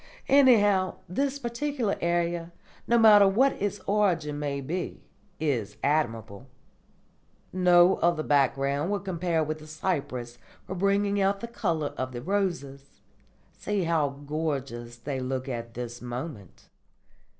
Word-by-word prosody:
Anyhow, 205 -9 +5
this 275 +9 -1
particular 245 -2 -2
idea, 170 0 -1 0.4
no 235 - +4
matter 210 -3 +7
what 255 +8 +4
its 205 0 -1
origin 175 -8 +1
may 140 -1 -2
be, 170 +7 -5 0.4
is 120 -10 -2
admirable. 115 -6 -1 1.1
No 180 0 +5
other 170 -2 +1
background 140 +2 +1
will 205 0 0
compare 175 -4 -1
with 155 +1 -4
the 155 - -12
cypress 135 -7 -3 0.3
for - - -5
bringing 200 +2 +1
out 195 +1 +1
the 235 - -6
colour 170 -10 -2
of 130 0 -3
the 120 - -5
roses. 170 -8 -3 0.5
See 205 -2 -2
how 165 -4 +1
gorgeous 140 -5 -4
they 135 +3 -4
look 130 +1 -3
at 115 -2 -5
this 120 0 -6
moment." 125 - -7
165 Hz, 130 wpm, -27 LUFS, 135-195 Hz, 1.1 s, matter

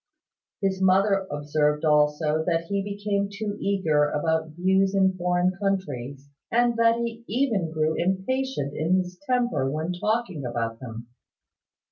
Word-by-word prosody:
His 190 -1 0
mother 195 +1 +3
observed 150 +1 0
also 150 +1 +2
that 165 -2 +1
he 200 0 0
became 200 0 -2
too 205 0 -4
eager 165 -7 +2
about 160 +2 0
views 190 +2 +2
in 190 -1 +3
foreign 180 0 +1
countries, 140 -9 -3 0.2
and 240 0 +3
that 230 0 +4
he 235 0 -4
even 220 -7 0
grew 155 0 +1
impatient 190 - -1
in 165 +4 +1
his 180 -1 -3
temper 245 - +1
when 155 +5 -2
talking 195 -4 -1
about 115 -2 -3
them. 115 -2 -8
185 Hz, 135 wpm, -25 LUFS, 150-200 Hz, 0.2 s, that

